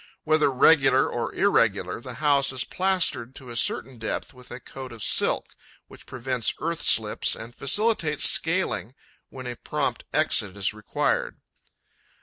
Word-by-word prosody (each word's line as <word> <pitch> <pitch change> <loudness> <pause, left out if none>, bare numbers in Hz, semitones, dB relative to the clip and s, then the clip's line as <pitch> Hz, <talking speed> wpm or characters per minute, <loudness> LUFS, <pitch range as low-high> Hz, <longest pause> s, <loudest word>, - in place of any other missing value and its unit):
Whether 155 -2 +3
regular 135 +1 +4
or - - -3
irregular, - - +1
the - - -8
house 140 -3 +2
is 130 -1 -2
plastered 165 -10 0
to 130 -3 -11
a - - -8
certain 120 +1 -2
depth 110 - -4
with 125 -1 -15
a 125 - -8
coat 130 0 -10
of 115 -3 -8
silk, - - +3 0.3
which - - -16
prevents 125 -1 -2
earth 165 0 -3
slips 110 -2 +2
and 115 +2 -10
facilitates 160 - +1
scaling 165 - 0 0.3
when 130 -1 -10
a 125 -1 -5
prompt - - -3
exit 100 0 +1
is 100 0 -1
required. 105 -1 -2
130 Hz, 145 wpm, -25 LUFS, 120-155 Hz, 0.3 s, regular